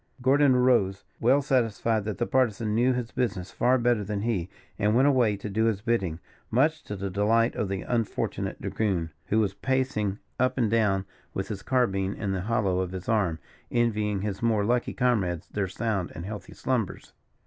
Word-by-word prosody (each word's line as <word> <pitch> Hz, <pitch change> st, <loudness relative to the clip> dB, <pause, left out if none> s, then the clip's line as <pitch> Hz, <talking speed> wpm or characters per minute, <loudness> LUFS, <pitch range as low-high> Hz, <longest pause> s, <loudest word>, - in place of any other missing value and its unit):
Gordon 135 Hz, +1 st, +4 dB
arose, 120 Hz, -6 st, +3 dB, 0.2 s
well 135 Hz, +5 st, +4 dB
satisfied 115 Hz, -5 st, +1 dB
that 105 Hz, -2 st, -3 dB
the 120 Hz, -, 0 dB
Partisan 115 Hz, -5 st, +1 dB
knew 120 Hz, +4 st, +3 dB
his 125 Hz, -1 st, -3 dB
business 100 Hz, -7 st, -2 dB
far 125 Hz, +1 st, +3 dB
better 120 Hz, -3 st, +2 dB
than 100 Hz, 0 st, -3 dB
he, 100 Hz, -6 st, -1 dB, 0.3 s
and 105 Hz, +1 st, +2 dB
went 130 Hz, +3 st, +5 dB
away 120 Hz, -7 st, +3 dB
to 105 Hz, -, -6 dB
do 110 Hz, +2 st, +1 dB
his 110 Hz, -3 st, +1 dB
bidding, 95 Hz, -9 st, 0 dB, 0.3 s
much 150 Hz, +7 st, +2 dB
to 105 Hz, -, -5 dB
the 100 Hz, 0 st, -4 dB
delight 110 Hz, +4 st, +2 dB
of 100 Hz, -, -1 dB
the 95 Hz, -1 st, -3 dB
unfortunate 115 Hz, -3 st, -2 dB
dragoon, 90 Hz, -7 st, -1 dB, 0.2 s
who 110 Hz, -, +2 dB
was 100 Hz, -3 st, +1 dB
pacing 130 Hz, -5 st, -1 dB, 0.2 s
up 130 Hz, +1 st, +1 dB
and 115 Hz, -5 st, +1 dB
down 105 Hz, -4 st, +2 dB, 0.3 s
with 95 Hz, -, -3 dB
his 100 Hz, -2 st, -4 dB
carbine 100 Hz, -7 st, +1 dB
in 100 Hz, -3 st, -3 dB
the 95 Hz, -1 st, -1 dB
hollow 100 Hz, -3 st, 0 dB
of 95 Hz, 0 st, -2 dB
his 95 Hz, -1 st, -6 dB
arm, 100 Hz, -8 st, +1 dB, 0.3 s
envying 105 Hz, -4 st, +1 dB
his 100 Hz, -1 st, -3 dB
more 110 Hz, -3 st, +2 dB
lucky 120 Hz, +2 st, 0 dB
comrades 100 Hz, -, 0 dB
their 100 Hz, -2 st, -1 dB
sound 100 Hz, -1 st, -2 dB
and 80 Hz, -, -6 dB
healthy 105 Hz, -2 st, -7 dB
slumbers. 120 Hz, -6 st, -2 dB
110 Hz, 185 wpm, -27 LUFS, 100-120 Hz, 0.3 s, went